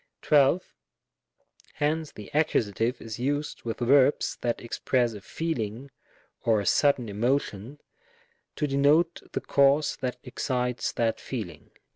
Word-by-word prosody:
12. 150 +4 +4 1.1
Hence 155 +1 -1
the 105 - -11
Accus. 120 -5 +1
is 115 0 -7
used 145 +3 -2
with 115 +1 -5
verbs 135 +3 +3
that 120 -1 -1
ex 120 - -6
press 120 -3 +1
a 105 - -9
feeling 135 -3 -4 0.5
or 110 -2 +3
a 100 - -3
sudden 135 +3 +3
emotion, 120 +2 -1 0.8
to 150 - -1
denote 150 +5 +3
the - - -2
cause 140 +2 +3
that 125 -1 -3
excites 125 -1 -2
that 115 -1 0
feeling. 90 - -6
125 Hz, 125 wpm, -27 LUFS, 115-145 Hz, 1.1 s, 12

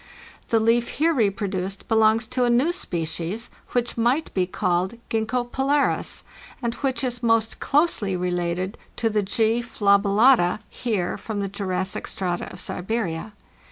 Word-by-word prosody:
The 225 - +3
leaf 230 +2 +3
here 330 +3 +3
reproduced 195 - -1
belongs 220 +1 +4
to 250 0 +1
a 245 - +3
new 250 +8 +3
species, 175 - -3 0.2
which 240 -1 0
might 245 +7 +1
be 185 -2 +1
called 180 +1 0 0.2
Gzxgko 240 +2 -1
polaris, 280 +2 +1 0.4
and 235 -3 -2
which 270 +1 -2
is 245 -2 -2
most 225 -1 +2
closely 275 - +1
rélated 180 +2 -2 0.2
to 225 -1 0
the 210 0 +2
G. 220 +4 +1
fadcllata 200 -1 +4
(Heer) 210 -8 -2
from 215 -2 -4
the 195 - -2
Jurassic 190 -1 -2
strata 180 -2 -3
of 180 - -10
Siberia. 190 0 -3
220 Hz, 140 wpm, -24 LUFS, 190-240 Hz, 0.4 s, belongs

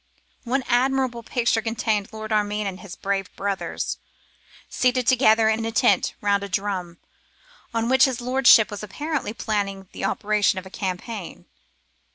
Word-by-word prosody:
One 260 +3 0
admirable 255 -1 +1
picture 230 -1 0
contained 220 -2 -1
Lord 220 0 -7
Armine 210 0 0
and 190 -1 -4
his 190 -3 -9
brave 195 -1 -2
brothers, 200 -1 -3 0.7
seated 255 -1 +1
together 225 -3 +4
in 220 +1 +1
a 225 - -2
tent 205 -4 +2
round 200 -1 +2
a 200 - -6
drum, 185 -3 -3 0.7
on 230 0 -1
which 260 +2 +5
his 260 -3 -2
lordship 250 -3 +5
was 205 - -6
apparently 290 +5 -3
planning 200 -4 -3
the - - -4
operations 210 -1 +1
of 185 - -4
the 190 - -12
campaign. 190 +1 -5
215 Hz, 150 wpm, -23 LUFS, 200-240 Hz, 0.7 s, which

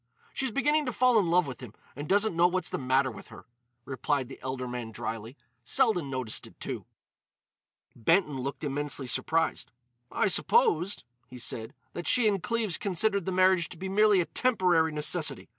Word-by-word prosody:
"She's 265 - -1
beginning 295 +4 +1
to - - 0
fall 250 -1 +3
in 180 -5 0
love 180 +1 +4
with 130 -3 -8
him 120 -5 -10 0.2
and 145 +3 -7
doesn't 205 -1 +2
know 170 +1 +5
what's 180 -1 -1
the - - -2
matter 130 0 +1
with - - -12
her," - - -13 0.4
replied 135 0 -2
the 135 - -10
elder 130 -1 -4
man 120 -2 -5
drily. 115 +4 -6 0.3
"Selden 205 - +2
noticed 130 -4 -2
it, - - -19
too." - - -6 1.1
Benton 150 - +2
looked 135 +3 -5
immensely 145 -1 -2
surprised. 160 +6 0 0.4
"I - - +1
supposed," 440 - +2 0.2
he 125 - -11
said, 115 -2 -4 0.2
"that 175 - -5
she 245 -3 +4
and 200 -3 +1
Cleves 215 0 -1
considered 200 0 0
the - - 0
marriage 185 -1 +3
to 180 - -11
be 190 +3 -5
merely 205 -1 +4
a - - -2
temporary 180 -11 +2
necessity. 150 -1 0
170 Hz, 175 wpm, -28 LUFS, 135-205 Hz, 1.1 s, know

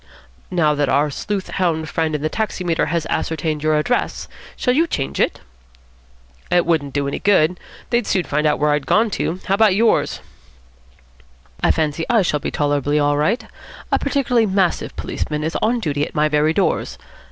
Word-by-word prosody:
"Now 165 -5 +2
that 145 -2 0
our 145 +1 +2
sleuth 195 +6 -4
hound 165 -4 0
friend 160 -1 -1
in 150 - -4
the - - +2
taximeter 180 -5 -1
has 170 -2 -1
ascertained 155 -1 -2
your 155 0 +2
address, 245 +12 -1 0.3
shall 250 - +1
you 325 +5 +2
change 135 - -3
it?" - - 0 1.1
"It 175 -1 +3
wouldn't 150 -5 0
do 140 -1 0
any 140 - -3
good. 180 -3 +3 0.3
They'd 240 -2 +1
soon 185 - +1
find 150 0 0
where 150 0 +2
I'd 145 -1 -1
gone 220 0 +3
to. 180 -1 -2
How 190 - 0
about 205 -2 +4
yours?" 225 +2 +2 1.4
"I - - +3
fancy 155 0 0
I 230 -4 +4
shall 150 -4 0
be - - -3
tolerably 145 0 0
all 145 0 +2
right. 175 - 0 0.5
A - - +3
particularly 250 -5 +1
massive 190 -2 0
policeman 150 0 -3
is 160 +2 -3
on 235 +2 +1
duty 145 -8 -1
at - - -5
my 150 0 +3
very 150 +1 +2
doors. - - 0
160 Hz, 175 wpm, -20 LUFS, 150-200 Hz, 1.4 s, about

